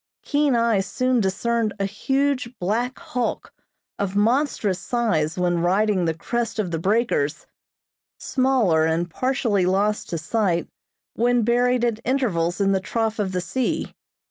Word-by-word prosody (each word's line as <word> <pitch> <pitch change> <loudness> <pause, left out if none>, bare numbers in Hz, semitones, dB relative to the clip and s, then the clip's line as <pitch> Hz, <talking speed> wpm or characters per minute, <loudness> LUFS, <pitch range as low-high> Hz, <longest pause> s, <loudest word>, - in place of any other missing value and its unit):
Keen 290 -3 +2
eyes 230 -5 +2
soon 255 +5 +1
discerned 215 +3 0
a 195 - +1
huge, 255 +4 -1
black 230 +7 -1
hulk, 305 -8 -3 0.5
of 200 -1 -2
monstrous 220 -3 +1
size 185 -12 0
when 175 -1 +1
riding 190 +2 +2
the 160 -1 0
crest 235 +7 -3
of 200 -5 -1
the 165 - -2
breakers, 185 -6 0 0.7
smaller 250 -12 +2
and 165 +2 0
partially 230 - 0
lost 205 +3 0
to 170 - -2
sight 175 +1 0 0.5
when 240 0 +2
buried 245 +1 +2
at 230 -2 -1
intervals 185 -11 0
in 195 -1 +2
the 190 - +2
trough 225 +3 -2
of 195 -2 -1
the 180 -1 -1
sea. 255 +7 -2
215 Hz, 145 wpm, -23 LUFS, 185-245 Hz, 0.7 s, Keen